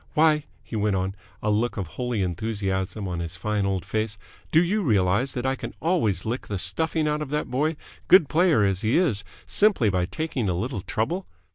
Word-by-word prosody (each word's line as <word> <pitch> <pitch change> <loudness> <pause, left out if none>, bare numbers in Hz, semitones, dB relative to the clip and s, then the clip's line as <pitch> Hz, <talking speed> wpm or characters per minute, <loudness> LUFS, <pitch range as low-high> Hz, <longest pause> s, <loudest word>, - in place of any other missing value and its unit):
Why," 150 -1 +4 0.2
he - - -7
went 105 -2 +1
on, 95 +1 -1 0.3
a 105 - +2
look 115 +3 0
of 100 - -2
holy 120 +3 -2
enthusiasm 95 +1 -2
on 90 -2 -3
his 85 +1 -4
fine 100 +2 -1
old 95 -2 -1
face, 110 0 -2 0.3
"do 160 +2 +5
you 205 +5 +1
realize 110 - +2
that 125 0 -3
I 130 - +2
can - - -7
always 115 - +1
lick 120 +4 -3
the 100 - -2
stuffing 155 - +1
out 150 0 0
of 150 - -4
that 150 +1 -2
boy, 150 +5 +1 0.3
good 185 -5 +7
player 160 - +3
as 95 -1 +1
he 110 +2 +2
is, 135 - +2 0.2
simply 200 - +3
by 90 -1 0
taking 120 - -2
a 90 - 0
little 115 +1 -3
trouble? 165 - -2
110 Hz, 205 wpm, -25 LUFS, 95-150 Hz, 0.3 s, good